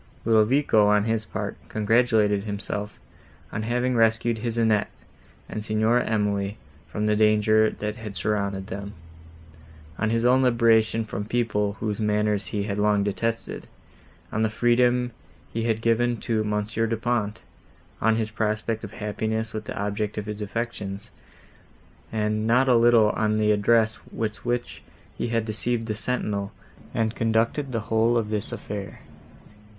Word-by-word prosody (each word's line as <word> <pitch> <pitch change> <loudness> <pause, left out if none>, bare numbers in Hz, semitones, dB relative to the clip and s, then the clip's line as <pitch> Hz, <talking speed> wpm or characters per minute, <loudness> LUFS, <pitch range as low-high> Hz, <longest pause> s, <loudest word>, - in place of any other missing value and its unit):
Ludovico, 110 0 +4
on 105 0 +4
his 110 0 -1
part, 105 -2 -4
congratulated 110 -2 +2
himself, 105 0 -4 0.5
on 110 - -3
having 125 +3 0
rescued 115 0 +2
his 115 +1 -3
Annette 110 -3 +2 0.6
and 110 - -5
Signora 110 +3 +2
Emily 105 -1 0 0.3
from 105 - -3
the 105 0 +2
danger, 110 0 +4
that 105 +1 -5
had 110 -3 -7
surrounded 100 -2 -1
them; 100 +1 -7 1.0
on 110 - +1
his 115 +1 +1
own 130 +2 +5
liberation 115 -2 +3
from 105 -1 -4
people, 105 -3 0
whose 105 0 -3
manners 105 -2 +1
he 100 +3 -2
had 100 0 -3
long 105 -1 +3
detested; 115 +3 -3 0.6
on 110 - -1
the 110 - +2
freedom 120 +2 +2 0.4
he 115 0 -1
had 110 -1 0
given 120 +1 +2
to 110 -2 0
Monsieur 105 +2 -1
Du 115 0 -1
Pont; 110 -2 -1 0.6
on 110 +1 +3
his 110 -1 -2
prospect 110 +1 -1
of 105 0 -7
happiness 110 +1 -3
with 110 -1 -5
the - - -5
object 105 +1 -2
of 105 - -3
his 105 0 -5
affections, 105 -2 -4 1.0
and 110 0 0
not 125 +3 +4
a 125 - +5
little 115 -2 +5
on 110 0 0
the 105 0 +3
address, 110 +1 +3
with 110 -1 -4
which 120 0 -2 0.3
he - - -2
had 115 -1 0
deceived 115 +1 -1
the 110 - -2
sentinel, 105 -2 -2 0.4
and 110 -1 0
conducted 115 +5 0
the 115 -2 -1
whole 110 +2 +2
of 110 -2 -1
this 105 +2 -2
affair. 105 -3 -6
110 Hz, 150 wpm, -25 LUFS, 105-115 Hz, 1.0 s, own